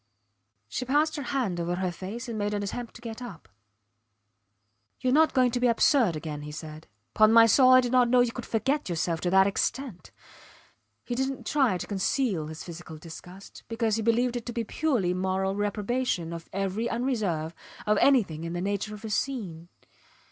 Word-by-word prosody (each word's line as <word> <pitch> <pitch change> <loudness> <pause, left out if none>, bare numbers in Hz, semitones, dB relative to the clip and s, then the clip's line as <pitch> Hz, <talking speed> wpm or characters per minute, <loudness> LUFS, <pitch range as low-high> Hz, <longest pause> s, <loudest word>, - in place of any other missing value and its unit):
She 250 - -3
passed 295 +5 +1
her - - -3
hand 245 -9 -2
over 170 +1 -1
her 185 0 -1
face 205 +8 -7
and 230 - -4
made 205 0 -1
an 205 - -2
attempt 235 +4 -5
to 235 - -13
get 225 0 -7
up. 190 - -9 1.5
Youre 255 0 +1
not 315 +2 +4
going 255 -2 +4
to 245 - -1
be 250 - +3
absurd 235 - +3
again, 150 -1 -5
he 150 0 -7
said. 155 0 -9 0.3
Pon 215 0 +5
my 230 0 +8
soul, 255 +3 +5
I 255 0 +8
did 245 -1 -2
not 250 -2 +4
know 250 0 +5
you 245 -1 +1
could 245 0 -7
forget 270 +3 0
yourself 165 -1 -1
to 180 - 0
that 190 +1 +5
extent. 205 +1 -2 1.0
He 245 - -3
didnt 265 +2 -2
try 265 -10 +2
to - - -5
conceal 200 - -1
his 160 0 -8
physical 165 -2 -9
disgust, 175 +4 -12
because 230 -2 0
he - - -1
believed 235 +2 +1
it 240 0 -5
to 240 - -4
be 235 - -1
a - - -5
purely 230 - 0
moral 190 +1 -1
reprobation 205 -3 -1
of 165 -1 -8
every 195 +4 -2
unreserve, 210 -11 -1 0.3
of 210 0 +2
anything 200 - +3
in 165 0 -4
the 175 - -3
nature 200 +2 -2
of 210 +2 -11
a - - -4
scene. 190 -10 -3
215 Hz, 195 wpm, -27 LUFS, 180-245 Hz, 1.5 s, my